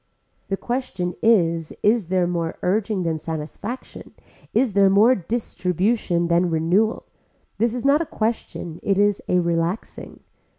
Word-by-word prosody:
The 195 - -2
question 195 -8 -3
is 170 -8 +2
is 210 -3 +3
there 180 0 +1
more 170 -2 -2
urging 200 0 0
than 160 -2 -1
satisfaction, 165 +10 -7 0.4
is 235 -2 +1
there 200 0 +5
more 210 +6 +5
distribution 185 -3 -1
than 175 +1 +2
renewal. 175 +8 +1 0.5
This 235 +1 +1
is 250 - -4
not 285 +3 +4
a 330 - -3
question, 215 -7 -3
it 195 -1 +1
is 205 0 +2
a 180 - +2
relaxing. 170 +3 -2
190 Hz, 135 wpm, -22 LUFS, 170-225 Hz, 0.5 s, there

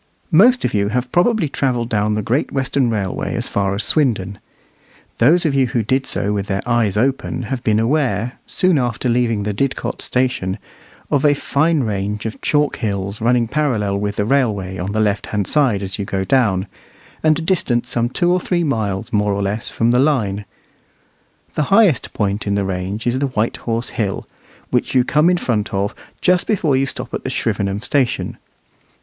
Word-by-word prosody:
Most 240 +10 +5
of - - -1
you 100 -1 +1
have 125 +3 -2
probably 200 0 +2
travelled 125 -4 -1
down 105 -1 +1
the 105 - -2
Great 125 +8 0
Western 135 -1 0
Railway 100 -5 -2
as - - -2
far 100 -1 0
as 105 - -1
Swindon. 105 - +2 0.8
Those 165 +9 +4
of 150 - +2
you 135 -2 +3
who 120 -1 -1
did 130 +5 0
so 105 +1 -1
with 100 -1 -2
their 95 0 -2
eyes 115 -5 +1
open 130 +2 0
have 120 +2 -4
been 110 -1 +2
aware, 120 -2 0
soon 185 -5 +2
after 120 0 -1
leaving 115 -3 +1
the 105 0 -2
Didcot 135 +5 -2
station, 125 -7 -1 0.5
of 140 - +2
a 145 -1 +4
fine 155 +2 +1
range 105 0 -3
of 110 - -5
chalk 150 -1 +1
hills 100 0 -3
running 120 0 +2
parallel 110 -8 0
with 100 0 -2
the 105 - 0
railway 105 -8 0
on 90 +3 -3
the 110 - -1
left 105 -1 0
hand 105 -2 -1
side 125 -9 +1
as 95 +2 -4
you 100 - -2
go 95 0 -2
down, 100 -8 +2 0.6
and 155 +1 +2
distant 140 -10 +1
some 120 0 -1
two 175 +7 +1
or 180 - +3
three 175 -1 0
miles, 110 - -2
more 105 -1 +2
or 100 0 -1
less, 105 +3 -2
from 115 +1 +1
the 125 - +3
line. 110 -9 +1 1.1
The 150 - 0
highest 195 - +4
point 100 0 -2
in 100 - +1
the 100 -1 0
range 95 +3 -3
is 125 +1 +1
the 140 - +1
White 125 +1 -1
Horse 115 -1 -2
Hill, 100 -4 -3 0.4
which - - 0
you 125 - +5
come 150 +6 +3
in 180 - +3
front 110 - -1
of 100 +1 -1 0.3
just 180 -1 +2
before 170 -10 +1
you 135 +1 +1
stop - - -6
at - - -3
the - - -3
Shrivenham 100 +2 -1
station. 130 -2 -1
115 Hz, 190 wpm, -19 LUFS, 100-140 Hz, 1.1 s, Most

